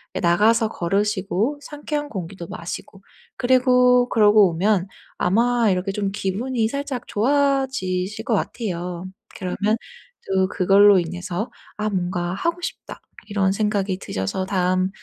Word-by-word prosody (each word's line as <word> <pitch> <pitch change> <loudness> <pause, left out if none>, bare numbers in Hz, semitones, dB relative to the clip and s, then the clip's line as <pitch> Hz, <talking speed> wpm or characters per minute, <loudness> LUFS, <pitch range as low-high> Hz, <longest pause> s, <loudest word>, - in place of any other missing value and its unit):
예 - - -1
나가서 215 +6 +3
걸으시고 205 +7 -1
상쾌한 295 0 -4
공기도 185 - -7
마시고 190 +3 -7 0.3
그리고 250 -1 +4
그러고 210 -3 +5
오면 190 +2 +1 0.3
아마 230 +4 +2
이렇게 185 +1 0
좀 195 0 -2
기분이 220 +4 -1
살짝 280 -1 -4
좋아지실 255 -7 0
것 240 - -1
같아요. 180 -5 -3 0.3
그러면 205 +3 -1 0.5
또 190 -1 +2
그걸로 195 +1 +5
인해서 180 +6 -4 0.3
'아 215 0 -1
뭔가 175 -2 -2
하고 335 - -2
싶다.' - - -7 0.3
이런 195 -2 +1
생각이 200 -2 0
드셔서 95 - -3
다음 185 -1 +1
205 Hz, 285 characters per minute, -22 LUFS, 185-240 Hz, 0.5 s, 그러고